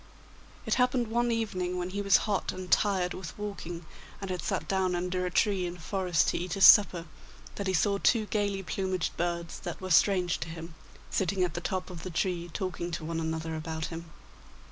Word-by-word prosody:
It - - +1
happened 250 -2 +2
one 240 +1 +1
evening, 185 -6 -1
when 180 0 -3
he 200 +1 -2
was 200 -2 +5
hot 205 -3 0
and 185 -1 -8
tired 190 -4 +3
with 185 -2 -8
walking, 175 -5 -6 0.3
and 195 -2 -5
had 180 - -2
sat - - -2
down 190 -2 +1
under 180 +1 -1
a - - -1
tree 190 -1 +2
in 175 +1 -6
a - - -16
forest 180 -1 +1
to - - -1
eat 180 0 -3
his 195 -1 +6
supper, 180 -5 +7 0.5
that 200 - -4
he 190 - +1
saw 200 +4 +2
two 225 0 +3
gaily 205 -2 -1
plumaged 185 0 -2
birds, 170 -1 -2
that 175 -3 -6
were 185 -1 -5
strange 180 +1 +4
to 165 - -5
him, 165 0 -8 0.4
sitting 190 0 +1
at 175 -3 0
the 175 - -4
top 185 +1 -3
of 170 -2 -8
the 185 - -5
tree 175 0 -1
talking 175 -1 -3
to 165 -2 -4
one 165 0 -2
another 160 0 -3
about 160 0 -4
him. 165 0 -7
180 Hz, 210 wpm, -29 LUFS, 170-195 Hz, 0.5 s, supper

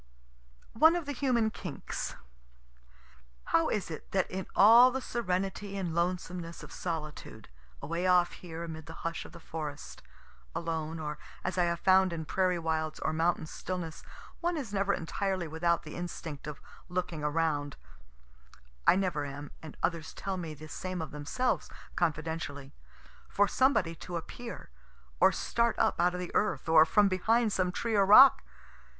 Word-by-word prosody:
ONE 320 +9 +6
OF 345 -3 -2
THE 285 - -3
HUMAN 245 -5 +1
KINKS 175 -10 -5 1.4
How - - +4
is - - -2
it - - -8
that - - +1
in 190 0 -4
all 230 +5 +8
the 260 +1 -2
serenity 195 -4 -2
and 180 -4 -2
lonesomeness 175 0 -2
of - - -11
solitude, 160 -4 -6 0.3
away 170 +5 -1
off 180 -1 +4
here 170 -2 -8
amid 160 -2 -7
the 160 - -10
hush 165 0 -3
of - - -11
the - - -12
forest, 150 -3 -7 0.5
alone, 165 -1 -3
or 150 -1 -5 0.2
as 185 0 -2
I 175 - +4
have 170 -1 -1
found 190 -1 +5
in 160 -1 -4
prairie 185 +1 +1
wilds, 160 -1 -2
or - - -1
mountain 165 +1 +1
stillness, 165 0 -5 0.4
one 345 0 -1
is 245 -9 -5
never 200 0 +1
entirely 190 0 -2
without 170 +2 0
the 155 - -9
instinct 165 -4 -6
of 150 -1 -6 0.3
looking 180 -4 -3
around, 150 -2 0 1.1
(I - - +8
never 185 -6 0
am, 145 +1 -7
and 155 - -10
others 165 -3 -1
tell 195 -1 -3
me 165 -4 -5
the 155 +2 -11
same 185 +2 -4
of 160 - -8
themselves, 150 - -1 0.3
confidentially,) 155 -4 -2 0.6
for 205 0 +3
somebody 255 -11 +2
to 175 +1 -5
appear, 235 - -8 0.5
or - - +6
start 235 0 0
up 220 - +2
out 180 +1 +3
of - - -4
the 180 - -5
earth, 210 - 0
or 160 -1 +7
from 210 +2 +4
behind 220 +4 +2
some 180 -1 +1
tree 225 +5 -2
or 200 -1 +4
rock? 260 +6 +9
175 Hz, 160 wpm, -30 LUFS, 160-195 Hz, 1.4 s, rock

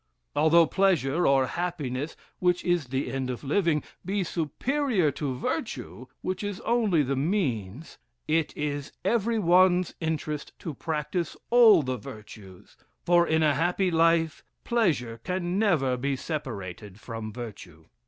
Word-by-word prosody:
Although 160 +3 +5
pleasure, 175 -3 +2
or 135 -1 +4
happiness, 150 -4 -3 0.2
which 180 -1 +1
is 175 -6 +1
the 130 +2 -2
end 130 -1 -2
of 125 +1 -5
living, 155 +1 +1 0.2
be 195 +2 -1
superior 185 - 0
to 140 -2 -3
virtue, 125 0 -4
which 185 +1 -3
is 205 -2 -4
only 220 -9 +2
the 135 +1 -1
means, 135 - -2 0.3
it 160 0 +1
is 145 -2 -3
every 230 0 +1
one's 180 -1 +4
interest 155 -2 -3
to 160 - -6
practice 160 +3 -3
all 225 -8 +7
the 130 -1 -2
virtues; 105 -3 -12 0.3
for 175 0 +4
in 160 0 +2
a 150 -2 +4
happy 180 +4 +1
life, 165 -1 +2 0.2
pleasure 150 - 0
can 180 +1 -1
never 155 -12 +2
be 135 +2 -1
separated 105 - -6
from 115 -1 -6
virtue. 100 -9 -9
160 Hz, 135 wpm, -27 LUFS, 130-180 Hz, 0.3 s, all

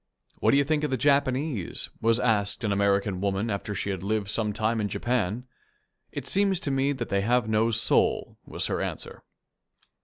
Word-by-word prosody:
"What - - +2
do 140 - +5
you 140 - +4
think 150 +1 0
of 150 - 0
the 130 - 0
Japanese?" 140 - +1
was 115 +1 +3
asked 110 -2 0
an 105 - 0
American 100 -1 +1
woman 100 +2 -1
after 100 +1 -3
she 100 - -2
had 95 -3 -4
lived 100 0 -1
some 105 0 -1
time 110 +2 0
in 105 - 0
Japan. 120 +1 -1 0.7
"It - - -6
seems 195 -2 +2
to 140 - -1
me 135 +1 +1
that 130 -4 -4
they 100 0 +1
have 120 +2 +1
no 110 +1 +2
soul," 115 0 +1
was - - -4
her - - -1
answer. - - -5
110 Hz, 190 wpm, -26 LUFS, 100-130 Hz, 0.7 s, do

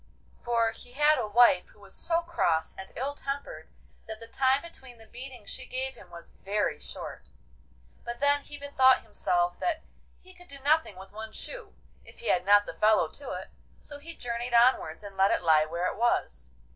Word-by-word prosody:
For 230 -2 +2
he 245 +2 -14
had 300 +2 +4
a - - -1
wife 210 -4 +5
who - - -22
was 200 -1 -13
so 335 0 0
cross 165 - 0
and 190 - -9
ill 275 +3 -2
tempered 280 0 -6 0.4
that 220 -1 -7
the 230 - -9
time 265 +4 +2
between 265 -7 -12
the 225 - -16
beatings 245 -1 -10
she 255 -1 -7
gave 265 +1 -3
him - - -16
was 170 0 -12
very 205 +2 0
short. 60 -1 -9 0.7
But 240 0 -6
then 285 +1 +3
he 290 - -10
bethought 265 -2 +4
himself 175 -5 0
that 335 -3 -1 0.4
he 370 0 -16
could 355 0 -16
do 280 - -10
nothing 290 - +2
with 190 +1 -12
one 220 +1 -8
shoe - - -8 0.3
if - - -16
he 475 - -4
had 180 +1 +2
not 205 0 +6
the - - -6
fellow 215 0 +3
to - - -8
it, - - -6 0.3
so 290 -1 -8
he 330 +3 -9
journeyed 240 0 -3
onwards 235 -8 +3
and 200 -1 -9
let 195 +1 +5
it - - +1
lie 155 -2 +5
where 170 +3 -2
it 185 - -2
was. 210 - 0
240 Hz, 200 wpm, -28 LUFS, 200-280 Hz, 0.7 s, not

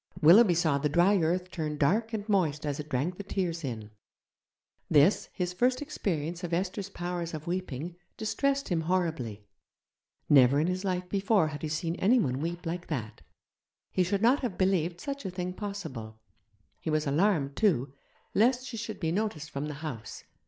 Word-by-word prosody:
Willoughby 180 +4 +7
saw 155 -4 +2
the 150 +1 0
dry 180 +6 +4
earth 180 +3 0
turn 155 -4 -3
dark 210 +11 +2
and 215 -2 -4
moist 165 -8 +1
as 145 -1 -2
it 150 0 -6
drank 150 +7 -1
the 200 - -5
tears 175 -4 -2
in. 110 -5 -5 1.0
This, 150 +7 +4
his 180 -2 -3
first 250 +7 +2
experience 175 - -3
of 170 -1 -1
Esther's 190 +2 -2
powers 175 -2 -4
of 155 0 -7
weeping, 175 -2 -4 0.2
distressed 275 +5 0
him 170 -3 +1
horribly; 160 - -1 0.8
never 135 0 +6
in 155 - +2
his 180 +2 -1
life 180 -2 -1
before 200 -3 +2
had 150 -1 -7
he 155 - -3
seen 165 +2 -1
anyone 185 - +2
weep 170 +2 -4
like 175 +2 -4
that, 110 - -4 0.7
he - - +1
should 195 +3 0
not 255 +5 +5
have 235 -9 -3
believed 180 -3 +1
such 280 +4 -5
a - - -3
thing 180 0 -4
possible; 160 - -6 0.6
he - - -4
was 155 0 +1
alarmed, 145 -2 +2
too, 145 - +2 0.4
lest 245 +4 +3
she 245 -3 -6
should 220 0 -5
be 160 -3 0
noticed 175 -6 -2
from 140 +2 -3
the 150 - -5
house. 115 -8 -6
175 Hz, 175 wpm, -29 LUFS, 150-200 Hz, 1.0 s, Willoughby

